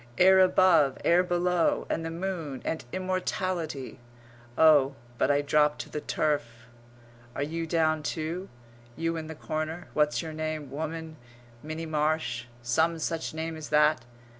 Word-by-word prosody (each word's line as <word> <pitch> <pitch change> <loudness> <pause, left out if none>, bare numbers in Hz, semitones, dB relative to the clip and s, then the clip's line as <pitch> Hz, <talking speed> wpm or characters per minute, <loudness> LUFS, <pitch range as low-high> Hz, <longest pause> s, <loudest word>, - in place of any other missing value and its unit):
Air 190 +1 +7
above, 180 -6 +5
air 175 +1 +5
below. 180 -1 +1
And 165 - -2
the 165 - -3
moon 165 -6 -4
and 160 - -2
immortality.... 185 -6 -3 0.6
Oh, 145 -4 +5 0.2
but - - +2
I 145 0 +3
drop 150 +1 +3
to - - -7
the 150 - -4
turf! 120 -8 -2 0.7
Are 140 - -1
you 165 +2 -3
down 155 -1 +2
too, 165 +5 -4 0.5
you 165 0 -1
in 160 -1 -5
the 160 - -7
corner, 155 +3 -4
what's 150 +2 +1
your 160 -1 -6
name 155 -3 -4
woman 160 +2 -5 0.4
Minnie 155 +2 -5
Marsh; 155 -6 -1 0.2
some 160 +8 +2
such 160 0 -3
name 160 0 -3
as 155 -1 -8
that? 150 -3 +4
160 Hz, 145 wpm, -28 LUFS, 150-165 Hz, 0.7 s, Air